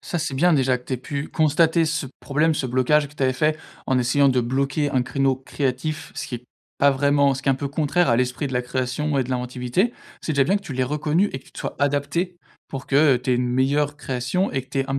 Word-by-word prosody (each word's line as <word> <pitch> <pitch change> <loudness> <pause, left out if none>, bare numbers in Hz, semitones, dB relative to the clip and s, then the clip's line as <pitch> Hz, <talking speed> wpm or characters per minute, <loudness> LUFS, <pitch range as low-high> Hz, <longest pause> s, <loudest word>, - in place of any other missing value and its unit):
Ça, 175 - -3
c'est 155 -3 -2
bien 175 +5 +3
déjà 130 -2 +2
que 125 - -21
tu - - -6
aies - - -2
pu 140 +4 -5
constater 160 +2 +3
ce 155 -2 -1
problème, 150 +3 +1
ce 135 - -2
blocage 135 +4 +2
que 150 - -19
tu 140 - -4
avais 130 - +3
fait, 155 +3 +1 0.3
en 130 -2 +2
essayant 135 +3 +3
de 125 -1 +2
bloquer 140 +4 0
un 130 -2 +1
créneau 135 0 0
créatif, 135 +3 -3
ce - - -4
qui 125 - -6
est 120 - -15 0.3
pas 140 0 +5
vraiment 140 0 +3
ce 135 - -5
qui 140 - -2
est - - +6
un - - +1
peu 140 +1 -4
contraire 155 +3 +1
à 115 - +4
l'esprit 125 +3 -1
de 130 - -6
la 125 - +1
création 130 +4 -2
et 130 - +1
de 130 - -7
l'inventivité. 125 - -1 0.3
C'est 160 - -2
déjà 140 -2 +3
bien 195 +7 +2
que 200 - -5
tu 140 - -7
l'aies 130 - 0
reconnu 150 +7 +1
et 130 - -3
que 130 - -22
tu - - -20
te - - -11
sois - - -5
adaptée, 145 +6 0 0.3
pour 135 -1 -6
que 140 -1 +4
tu 125 +1 -3
aies - - +4
une 125 0 0
meilleure 140 +3 +1
création 130 +8 -1
et 135 -2 -2
que 130 - -22
tu 135 - -2
aies - - -1
un 135 - 0
140 Hz, 270 wpm, -23 LUFS, 130-150 Hz, 0.3 s, est